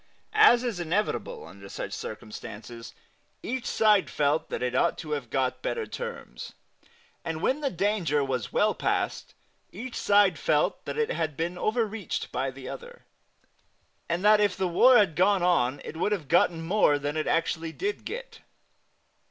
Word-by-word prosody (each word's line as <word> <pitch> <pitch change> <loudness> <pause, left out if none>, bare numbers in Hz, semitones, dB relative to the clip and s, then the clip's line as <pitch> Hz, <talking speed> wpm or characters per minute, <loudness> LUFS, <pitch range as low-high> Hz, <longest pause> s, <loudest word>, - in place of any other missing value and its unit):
As 425 - +6
is 235 -7 -2
inevitable 175 +5 -2
under 100 +3 -12
such - - -6
circumstances, 115 +2 -8 0.5
each 255 +1 -3
side 210 -3 +3
felt 150 +1 0
that - - -3
it 125 0 -1
ought 130 - +2
to 155 -3 -7
have 140 -6 -3
got 130 0 -1
better 460 -2 -2
terms; 480 +1 -7 0.7
and 165 -1 -3
when 265 - 0
the 280 - 0
danger 180 - 0
was 130 -5 -3
well - - +2
past - - -2 0.4
each 235 +5 -7
side 205 -2 +3
felt - - +1
that - - -5
it 455 -1 0
had 155 -4 -2
been 170 +2 -2
over 220 +5 0
reached 210 -4 -5
by 130 +2 -1
the 130 0 -10
other, 485 +1 -9 1.0
and 175 +4 -1
that 210 0 +6
if 205 -3 +1
the 190 -1 0
war 245 +9 +6
had 200 -8 +3
gone 190 +1 +3
on 140 -7 +2
it - - -7
would 190 +6 0
have 170 -9 -4
gotten 165 +1 +3
more 170 -5 +3
than 145 +1 -3
it 155 - -1
actually 165 0 0
did 405 - -3
get. - - -7
175 Hz, 170 wpm, -27 LUFS, 145-215 Hz, 1.0 s, As